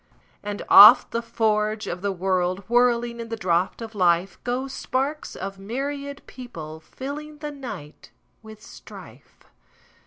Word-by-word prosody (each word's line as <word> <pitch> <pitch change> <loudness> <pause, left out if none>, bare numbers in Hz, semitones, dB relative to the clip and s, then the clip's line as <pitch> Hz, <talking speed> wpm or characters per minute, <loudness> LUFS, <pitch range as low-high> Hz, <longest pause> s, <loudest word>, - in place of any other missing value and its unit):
And 205 0 -5
off 210 +5 +9
the 235 - -1
forge 215 -2 -1
of 175 +1 -5
the 200 0 -1
world, 185 0 -1
Whirling 240 0 +2
in 230 -1 -7
the 225 - -3
draught 180 +2 -1
of 225 0 -9
life, 180 -1 +1
Go 250 +2 -2
sparks 270 +2 -3
of 195 0 -7
myriad 280 +6 -5
people, 160 -11 -10
fillingThe 295 - -8
night 205 - -9 0.3
with 220 -1 -13
strife. - - -14
225 Hz, 130 wpm, -24 LUFS, 195-255 Hz, 0.3 s, off